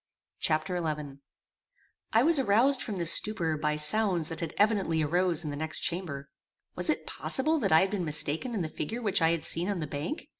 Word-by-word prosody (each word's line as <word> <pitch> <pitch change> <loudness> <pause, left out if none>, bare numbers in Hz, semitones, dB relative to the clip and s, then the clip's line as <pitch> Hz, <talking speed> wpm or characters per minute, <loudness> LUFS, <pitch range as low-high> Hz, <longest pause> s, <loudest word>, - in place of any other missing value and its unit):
Chapter 170 +3 -1
XI 150 -3 -5 0.9
I 225 +2 +3
was 320 0 +4
aroused 250 +4 +2
from 205 -4 -5
this 170 -1 +5
stupor 175 -7 +1
by 150 0 -2
sounds 170 +2 +3
that 165 - -6 0.2
evidently 195 -7 +1
arose 175 +2 +1
in 150 - -5
the - - -6
next 155 +2 -3
chamber. 150 -6 -4 0.4
Was - - -1
it - - -1
possible 310 +4 -1
that - - -1
I 160 - +6
had 190 - -1
been 200 -4 -3
mistaken 155 - 0
in 195 - -2
the - - -3
figure 225 +11 -6
which 200 -5 0
I 160 - +3
had 165 -2 -2
seen 175 +4 +1
on 200 - -2
the 155 - -3
bank? 150 - -6
170 Hz, 200 wpm, -28 LUFS, 155-210 Hz, 0.9 s, I